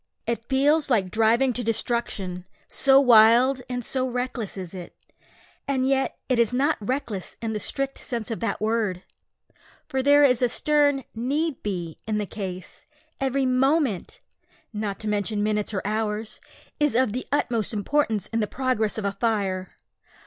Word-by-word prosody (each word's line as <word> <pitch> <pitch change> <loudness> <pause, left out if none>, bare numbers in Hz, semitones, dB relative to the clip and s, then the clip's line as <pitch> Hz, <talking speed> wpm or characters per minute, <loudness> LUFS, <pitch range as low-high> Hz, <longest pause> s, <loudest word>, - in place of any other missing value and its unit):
It 235 0 -3
feels 285 +3 +3
like 195 -7 +1
driving 230 +4 +3
to 245 - -3
destruction 210 -5 -2 0.2
so 270 0 +5
wild 245 +1 +6
and 245 -2 -3
so 260 -1 0
reckless 245 -4 -4
is 185 -2 -6
it. 180 -2 -9 0.7
And 265 -2 +1
yet 270 0 0
it 255 -3 +1
is 235 -1 +3
not 275 +6 +2
reckless 215 -4 -3
in 225 -1 -3
the 210 - -2
strict 275 +5 -3
sense 235 -3 -4
of 225 - -3
that 230 -3 -2
word; 215 -4 -1 0.8
for 265 - -2
there 285 +2 +5
is 255 -3 +4
a 245 - +3
stern 290 0 +2
need 280 +6 -1
be 175 -6 -4
in 215 -1 0
the 210 - -1
case. 185 -3 -7 0.3
Every 270 0 0
moment 260 - +1 0.5
(not 210 -2 -3
to 215 - -5
mention 205 0 -1
minutes 210 0 0
or 195 -3 -3
hours) 215 0 -3 0.4
is 295 -5 +2
of 245 -4 +2
the 255 - -4
utmost 235 -6 0
importance 220 0 0
in 230 - -2
the 210 - 0
progress 250 -5 0
of 215 - -3
a 200 - +1
fire. 200 -4 -1
230 Hz, 165 wpm, -25 LUFS, 210-265 Hz, 0.8 s, wild